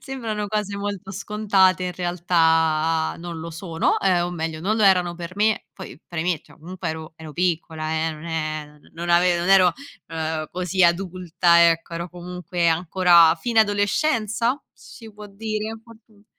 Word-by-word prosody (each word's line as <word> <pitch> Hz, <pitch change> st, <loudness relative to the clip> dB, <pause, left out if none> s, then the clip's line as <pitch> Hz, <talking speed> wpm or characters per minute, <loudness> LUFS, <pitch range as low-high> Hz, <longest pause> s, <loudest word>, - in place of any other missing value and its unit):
sembrano 225 Hz, -6 st, -4 dB
cose 205 Hz, -1 st, -3 dB
molto 200 Hz, -1 st, -5 dB
scontate 195 Hz, -2 st, +1 dB
in 180 Hz, -, -3 dB
realtà 165 Hz, -2 st, +1 dB
non 170 Hz, -1 st, -7 dB
lo 165 Hz, +1 st, -7 dB
sono, 165 Hz, 0 st, -1 dB
ehm, 180 Hz, -3 st, +2 dB
o 175 Hz, -, -5 dB
meglio 160 Hz, -2 st, -4 dB
non 205 Hz, +6 st, 0 dB
lo 220 Hz, -, +1 dB
erano 180 Hz, -3 st, +4 dB
per 170 Hz, +1 st, -8 dB
me; 215 Hz, +1 st, +1 dB
poi 190 Hz, -, -10 dB
premetto, 170 Hz, -1 st, -3 dB
comunque 180 Hz, +3 st, -6 dB
ero 160 Hz, 0 st, -7 dB
ero 160 Hz, -2 st, -10 dB
piccola 160 Hz, -2 st, -2 dB, 0.2 s
eh, 160 Hz, -, -4 dB
non 155 Hz, +1 st, -11 dB
è 155 Hz, -2 st, -3 dB, 0.3 s
non 170 Hz, +1 st, -6 dB
ave 175 Hz, 0 st, +4 dB
non 175 Hz, +2 st, -2 dB
ero, 185 Hz, -2 st, +6 dB, 0.4 s
uhm, 160 Hz, -1 st, -3 dB
così 185 Hz, +1 st, +1 dB
adulta, 170 Hz, -1 st, +3 dB
ecco. 165 Hz, +1 st, -3 dB
Ero 170 Hz, +1 st, -5 dB
comunque 175 Hz, -1 st, -3 dB
ancora 170 Hz, 0 st, +5 dB
fine 235 Hz, -2 st, +2 dB
adolescenza? 220 Hz, +4 st, 0 dB
Si 225 Hz, -3 st, -14 dB
può 210 Hz, 0 st, -11 dB
dire? 215 Hz, +1 st, -4 dB
Oddi 220 Hz, -3 st, -19 dB
180 Hz, 155 wpm, -23 LUFS, 165-205 Hz, 0.4 s, ero